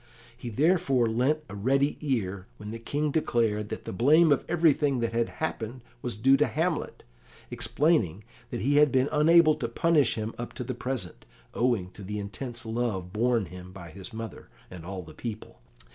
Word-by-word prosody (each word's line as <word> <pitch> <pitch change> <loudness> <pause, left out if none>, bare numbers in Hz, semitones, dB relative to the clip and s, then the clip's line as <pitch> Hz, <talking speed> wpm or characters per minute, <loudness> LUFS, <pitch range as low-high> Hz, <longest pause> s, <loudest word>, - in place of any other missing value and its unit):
He 120 0 -7
therefore 135 - +2
lent 130 +7 +1
a - - -10
ready 135 +8 +1
ear 100 -10 -2
when 105 0 -8
the 115 - -6
King 145 +5 -1
declared 115 -8 0
that - - -6
the - - -5
blame 150 - +5
of 140 - +3
everything 150 -5 +3
that 115 0 -1
had 115 0 +1
happened 125 -5 -4 0.2
was 120 -3 -3
due 130 +6 +5
to 150 - +3
Hamlet, 165 +1 -2 0.5
explaining 115 - +1 0.3
that 120 - -4
he 145 +4 +2
had 150 -2 +6
been 130 +2 +2
unable 155 +1 +6
to 120 - -3
punish 150 +2 +2
him 110 0 -4
up 120 - -5
to - - -5
the 130 - -4
present, 125 -7 -4 0.3
owing 115 -7 0
to 105 - -11
the 105 +2 -5
intense 115 +4 -6
love 110 -6 -2
borne 115 -1 +2
him 90 0 -10
by 90 -3 -10
his 95 0 -10
mother, 115 0 -8 0.2
and 85 -2 -9
all 95 -1 -5
the 80 -1 -12
people. 110 +2 -7
120 Hz, 185 wpm, -28 LUFS, 105-145 Hz, 0.5 s, had